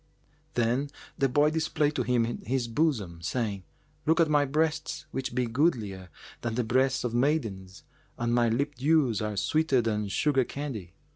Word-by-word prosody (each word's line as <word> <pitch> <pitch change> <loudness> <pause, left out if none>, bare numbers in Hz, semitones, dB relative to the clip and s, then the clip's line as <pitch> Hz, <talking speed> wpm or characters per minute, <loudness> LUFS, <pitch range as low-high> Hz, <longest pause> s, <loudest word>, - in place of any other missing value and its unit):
"[FN#390] - - -37
Then 125 +4 +1 0.3
the 135 - +1
boy 145 +4 +3
displayed 155 -2 0
to - - +1
him 120 -2 +2 0.2
his 125 0 -1
bosom, 115 - 0
saying, 105 +1 -2 0.5
"Look 160 +2 +4
at 160 -2 +4
my 145 -1 +4
breasts 155 +1 -1
which 130 -2 -4
be 125 -1 +1
goodlier 115 - 0 0.3
than 120 -2 -2
the 125 - +1
breasts 130 +3 +1
of 120 -2 -2
maidens 115 -9 -1 0.3
and 120 0 0
my 120 -1 +3
lip 140 +6 0
dews 135 -4 +2
are 105 -1 -3
sweeter 155 +4 +2
than 105 -3 0
sugar 135 +6 +2
candy. 120 - -6
125 Hz, 165 wpm, -28 LUFS, 115-150 Hz, 0.5 s, Look